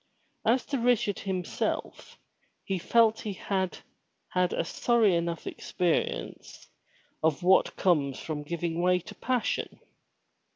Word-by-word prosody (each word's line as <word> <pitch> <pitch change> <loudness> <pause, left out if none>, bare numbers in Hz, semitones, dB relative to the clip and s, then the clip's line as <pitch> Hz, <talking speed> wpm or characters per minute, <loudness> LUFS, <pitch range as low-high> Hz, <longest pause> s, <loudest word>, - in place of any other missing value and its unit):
As 245 +3 +2
to 275 -2 -2
Richard 235 -4 +2
himself 185 -3 -3 0.5
he 190 -2 -2
felt 225 +3 +4
that - - -8
he 210 - -4
had 190 -1 -2 0.5
had 180 -1 +1
a - - -1
sorry 225 0 +3
enough 170 -1 -2
experience 160 - -2 0.5
of 160 +2 +1
what 190 +1 +4
comes 145 -8 +2
from 155 -2 -4
giving 170 +2 -3
way 180 0 +4
to 195 +4 -9
passion. 250 +2 -2
180 Hz, 125 wpm, -28 LUFS, 170-215 Hz, 0.5 s, felt